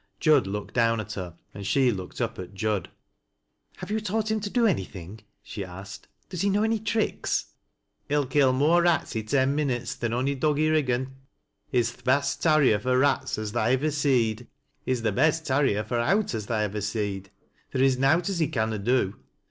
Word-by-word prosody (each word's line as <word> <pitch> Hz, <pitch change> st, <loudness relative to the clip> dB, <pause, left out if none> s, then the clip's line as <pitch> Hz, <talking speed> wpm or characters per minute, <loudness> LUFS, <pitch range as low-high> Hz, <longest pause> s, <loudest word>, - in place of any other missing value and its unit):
Jud 150 Hz, -9 st, +4 dB
looked 105 Hz, +1 st, -5 dB
down 115 Hz, -1 st, +2 dB
at 110 Hz, 0 st, -5 dB
her, 90 Hz, -4 st, -6 dB, 0.2 s
and 100 Hz, -, -8 dB
she 125 Hz, +5 st, +3 dB
looked 95 Hz, +2 st, -6 dB
up 115 Hz, -1 st, -2 dB
at 95 Hz, +1 st, -8 dB
Jud. 105 Hz, -2 st, -1 dB, 0.4 s
" -, -, -38 dB
Have -, -, -7 dB
you 220 Hz, -, +1 dB
taught 215 Hz, +1 st, -1 dB
him 220 Hz, -, +1 dB
to 205 Hz, 0 st, -4 dB
do 240 Hz, +2 st, +2 dB
anything? 95 Hz, -, -2 dB
" -, -, -49 dB
she 100 Hz, -, -6 dB
asked. 95 Hz, +3 st, -10 dB
" -, -, -41 dB
Does 180 Hz, -3 st, -4 dB
he 200 Hz, -, +2 dB
know 205 Hz, +2 st, +2 dB
any 220 Hz, 0 st, +1 dB
tricks? 220 Hz, +1 st, -1 dB, 0.2 s
" -, -, -51 dB
" -, -, -46 dB
He'll 145 Hz, 0 st, +2 dB
kill 135 Hz, -1 st, +3 dB
more 150 Hz, +7 st, +3 dB
rats 170 Hz, -7 st, +1 dB
i' 110 Hz, -, 0 dB
ten 130 Hz, +4 st, +1 dB
minutes 130 Hz, -5 st, -1 dB
than 120 Hz, -1 st, -3 dB
ony 130 Hz, +4 st, 0 dB
dog 145 Hz, +2 st, 0 dB
i' -, -, +1 dB
Kiggan. 130 Hz, -5 st, +1 dB, 0.6 s
He's 120 Hz, -4 st, +2 dB
th' -, -, -21 dB
best 140 Hz, +3 st, +1 dB
tarrier 155 Hz, -10 st, +4 dB
fur 125 Hz, +4 st, +1 dB
rats 140 Hz, +1 st, +1 dB
as 110 Hz, -1 st, -4 dB
tha 120 Hz, -, -1 dB
ivver 130 Hz, +7 st, +1 dB
seed. 125 Hz, -6 st, +1 dB, 0.4 s
He's 130 Hz, -2 st, -1 dB
th' 110 Hz, -3 st, +1 dB
best 160 Hz, +7 st, +2 dB
tarrier 130 Hz, -6 st, +1 dB
for 120 Hz, +3 st, -2 dB
owt 195 Hz, -, +1 dB
as 110 Hz, -2 st, -4 dB
tha 115 Hz, -, -1 dB
ivver 105 Hz, -1 st, -1 dB
seed. 100 Hz, -2 st, -3 dB, 0.4 s
Theer 130 Hz, -1 st, +1 dB
in 130 Hz, -2 st, +3 dB
nowt 160 Hz, +6 st, +3 dB
as 195 Hz, -3 st, -1 dB
he 160 Hz, -, +2 dB
canna 110 Hz, -3 st, -1 dB
do. 110 Hz, -2 st, 0 dB
130 Hz, 210 wpm, -26 LUFS, 110-155 Hz, 0.6 s, Jud